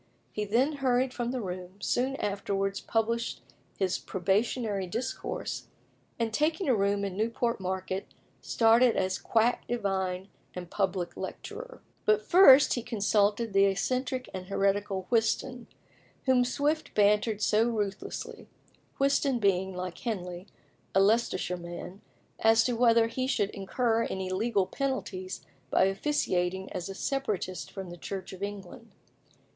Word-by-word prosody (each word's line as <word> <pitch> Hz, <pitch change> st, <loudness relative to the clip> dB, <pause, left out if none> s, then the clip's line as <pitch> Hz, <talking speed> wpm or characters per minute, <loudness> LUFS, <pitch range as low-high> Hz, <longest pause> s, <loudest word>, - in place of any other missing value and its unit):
He 210 Hz, -, -3 dB
then 260 Hz, +8 st, +1 dB
hurried 255 Hz, -1 st, +1 dB
from 240 Hz, -2 st, -2 dB
the 255 Hz, 0 st, -2 dB
room, 185 Hz, +1 st, -6 dB
soon 255 Hz, +5 st, 0 dB
afterwards 195 Hz, -2 st, -2 dB
published 230 Hz, +1 st, -1 dB, 0.3 s
his 190 Hz, -2 st, 0 dB
probationary 200 Hz, +1 st, 0 dB
discourse, 230 Hz, +8 st, -4 dB, 0.5 s
and 230 Hz, -2 st, -1 dB
taking 310 Hz, -, +1 dB
a 260 Hz, -, +4 dB
room 200 Hz, -1 st, +1 dB
in 195 Hz, -2 st, -4 dB
Newport 230 Hz, +2 st, 0 dB
Market, 190 Hz, +1 st, -3 dB, 0.3 s
started 230 Hz, +1 st, +4 dB
as 185 Hz, 0 st, 0 dB
quack 230 Hz, +2 st, +1 dB
divine 190 Hz, -4 st, -2 dB, 0.3 s
and 180 Hz, -1 st, -7 dB
public 185 Hz, -3 st, -1 dB
lecturer. -, -, -7 dB, 0.2 s
But 215 Hz, 0 st, +3 dB
he -, -, -24 dB
first 285 Hz, -8 st, +7 dB
consulted 210 Hz, -1 st, +1 dB
the 195 Hz, 0 st, +5 dB
eccentric 255 Hz, +7 st, -1 dB
and 185 Hz, -1 st, -6 dB
heretical 195 Hz, -1 st, 0 dB
Whiston, 235 Hz, +1 st, 0 dB, 0.6 s
whom 255 Hz, -2 st, +4 dB
Swift 295 Hz, +5 st, -1 dB
bantered 210 Hz, +1 st, +3 dB
so 215 Hz, +2 st, +3 dB
ruthlessly 205 Hz, -4 st, -4 dB, 0.5 s
Whiston 275 Hz, -1 st, +2 dB
being, 190 Hz, -3 st, +1 dB
like 180 Hz, -1 st, -5 dB
Henley, 180 Hz, -5 st, -4 dB, 0.5 s
a -, -, +6 dB
Leicestershire 195 Hz, -3 st, +2 dB
man 175 Hz, +3 st, -8 dB, 0.4 s
as 225 Hz, 0 st, +5 dB
to 250 Hz, -, 0 dB
whether 230 Hz, -1 st, +4 dB
he 255 Hz, +3 st, -2 dB
should 210 Hz, -6 st, 0 dB
incur 230 Hz, +3 st, 0 dB
any 190 Hz, -1 st, -3 dB
legal 205 Hz, 0 st, +1 dB
penalties 225 Hz, -8 st, -4 dB, 0.2 s
by -, -, +4 dB
officiating 190 Hz, -4 st, 0 dB
as 180 Hz, -, -4 dB
a 195 Hz, -, -6 dB
separatist 210 Hz, -9 st, -2 dB
from 190 Hz, -3 st, -7 dB
the 175 Hz, -, -9 dB
Church 190 Hz, +2 st, -6 dB
of 190 Hz, -, -10 dB
England. 200 Hz, -2 st, -7 dB
210 Hz, 135 wpm, -29 LUFS, 190-240 Hz, 0.6 s, first